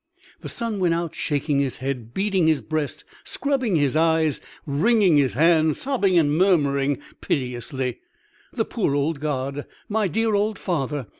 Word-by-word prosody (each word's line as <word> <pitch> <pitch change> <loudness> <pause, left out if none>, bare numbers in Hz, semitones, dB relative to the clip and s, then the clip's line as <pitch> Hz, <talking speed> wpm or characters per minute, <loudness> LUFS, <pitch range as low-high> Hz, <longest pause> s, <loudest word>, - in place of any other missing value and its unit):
The - - -8
Son 230 -3 -3
went 175 -3 +2
out, 170 -1 -3
shaking 145 -1 -1
his 135 -2 -1
head, 125 -4 -4
beating 190 0 +1
his 155 -3 +2
breast, 155 -2 -3 0.2
scrubbing 265 -8 -1
his 145 -3 +1
eyes, 160 -2 +2 0.2
wringing 185 +3 +3
his 135 -5 +2
hands, 160 +1 +3
sobbing 205 -10 +1
and 150 -3 +3
murmuring 145 -6 +2 0.2
piteously. 125 0 -3 0.5
"The - - -1
poor 140 - -1
old 145 +1 0
God! 140 -1 -3 0.2
my 215 -1 0
dear 225 +4 0
old 205 +1 +1
father! 145 - -2
155 Hz, 150 wpm, -23 LUFS, 140-190 Hz, 0.5 s, wringing